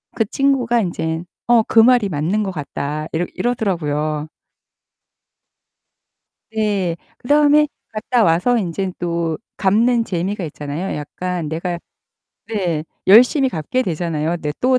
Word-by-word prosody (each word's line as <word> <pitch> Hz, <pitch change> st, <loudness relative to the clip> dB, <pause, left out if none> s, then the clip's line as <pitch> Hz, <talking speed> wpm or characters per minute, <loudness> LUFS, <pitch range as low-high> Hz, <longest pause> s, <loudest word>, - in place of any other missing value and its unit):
그 225 Hz, -, +1 dB
친구가 245 Hz, -1 st, +1 dB
인제 165 Hz, -3 st, -2 dB, 0.2 s
"어 240 Hz, -2 st, +5 dB
그 225 Hz, -, +3 dB
말이 235 Hz, -2 st, +5 dB
맞는 175 Hz, +7 st, 0 dB
것 195 Hz, -, -3 dB
같다." 150 Hz, -1 st, -4 dB
이러 165 Hz, +2 st, 0 dB
이러더라고요. 155 Hz, -9 st, -1 dB, 2.3 s
예. 200 Hz, -5 st, 0 dB, 0.2 s
그다음에 295 Hz, +2 st, +4 dB, 0.2 s
갔다 225 Hz, +2 st, +1 dB
와서 175 Hz, +8 st, +3 dB
인제 190 Hz, -1 st, -2 dB
또 170 Hz, -2 st, -1 dB, 0.2 s
갚는 230 Hz, +5 st, +3 dB
재미가 190 Hz, 0 st, -3 dB
있잖아요. 150 Hz, +4 st, -4 dB
약간 175 Hz, +3 st, -4 dB
내가 170 Hz, +2 st, -3 dB, 0.7 s
네 180 Hz, -8 st, -1 dB, 0.2 s
열심히 250 Hz, -, +6 dB
갚게 170 Hz, -, -1 dB
되잖아요 165 Hz, -3 st, -2 dB
네 150 Hz, -2 st, -3 dB
또 255 Hz, 0 st, +3 dB
185 Hz, 245 characters per minute, -19 LUFS, 160-230 Hz, 2.3 s, 열심히